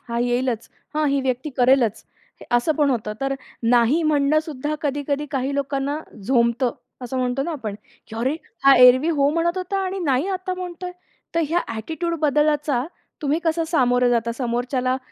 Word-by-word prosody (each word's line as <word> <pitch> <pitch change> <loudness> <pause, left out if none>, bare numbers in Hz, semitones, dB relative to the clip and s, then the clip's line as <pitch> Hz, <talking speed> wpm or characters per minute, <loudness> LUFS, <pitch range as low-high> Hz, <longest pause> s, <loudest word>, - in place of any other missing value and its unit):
हा 235 - -2
येईलच." 245 -1 -1 0.3
"हां, 305 0 +1
ही 280 0 +1
व्यक्ती 260 +2 -2
करेलच." 245 -4 +3 0.4
हे - - -12
असं 240 +7 +2
पण 290 -1 +2
होतं. 215 -4 -1
तर 275 0 0 0.3
नाही 240 +7 +3
म्हणणं 300 -1 +3
सुद्धा 295 -1 -4
कधी-कधी 290 0 -1
काही 270 0 -1
लोकांना 280 +1 -1 0.3
झोंबतं, 240 +1 +2 0.3
असं 250 +2 -4
म्हणतो 250 +1 0
ना 335 - -3
आपण, 225 -9 -5 0.3
की 220 - -8
"अरे 260 +7 0 0.3
हा 275 0 +8
एरवी 250 +4 +7
हो 285 -4 +2
म्हणत 335 +3 0
होता 370 +2 -2
आणि 380 +1 -3
नाही 275 +2 +1
आता 370 -1 -2
म्हणतोय?" 360 0 -6 0.4
तर 335 - +2
ह्या 340 +3 +2
ॲटिट्यूड 320 +10 -3
बदलाचा 295 -3 +2 0.4
तुम्ही 295 +2 +1
कसं 330 0 +1
सामोरं 250 -5 +3
जाता? 235 -1 +1
समोरच्याला 250 +1 -1
275 Hz, 165 wpm, -22 LUFS, 245-310 Hz, 0.4 s, हा